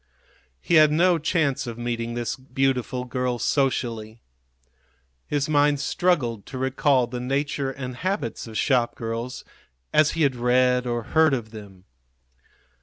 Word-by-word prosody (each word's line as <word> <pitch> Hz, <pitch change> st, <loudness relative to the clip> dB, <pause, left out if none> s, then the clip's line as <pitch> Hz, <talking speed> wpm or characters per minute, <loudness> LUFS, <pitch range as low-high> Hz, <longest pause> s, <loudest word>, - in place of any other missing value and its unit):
He -, -, -3 dB
had 155 Hz, -1 st, +5 dB
no 170 Hz, +2 st, +3 dB
chance 150 Hz, -5 st, 0 dB
of 115 Hz, -1 st, -6 dB
meeting 120 Hz, -1 st, -3 dB
this 120 Hz, -2 st, -2 dB
beautiful 130 Hz, -1 st, -1 dB
girl 125 Hz, 0 st, -2 dB
socially. 115 Hz, -4 st, -1 dB, 1.0 s
His 145 Hz, -2 st, -1 dB
mind 145 Hz, -1 st, +3 dB
struggled 135 Hz, -, 0 dB
to 135 Hz, -, -7 dB
recall 130 Hz, 0 st, +2 dB
the 125 Hz, +1 st, -6 dB
nature 135 Hz, +2 st, -1 dB
and 130 Hz, -2 st, -6 dB
habits 175 Hz, -, -3 dB
of 110 Hz, -1 st, -6 dB
shopgirls 120 Hz, -1 st, -1 dB, 0.5 s
as 155 Hz, 0 st, +4 dB
he 165 Hz, -, +2 dB
had 135 Hz, -3 st, +2 dB
read 125 Hz, +1 st, +2 dB
or 120 Hz, -1 st, -2 dB
heard 160 Hz, -3 st, +5 dB
of 110 Hz, -4 st, -6 dB
them. 100 Hz, -4 st, -12 dB
125 Hz, 135 wpm, -24 LUFS, 120-145 Hz, 1.0 s, had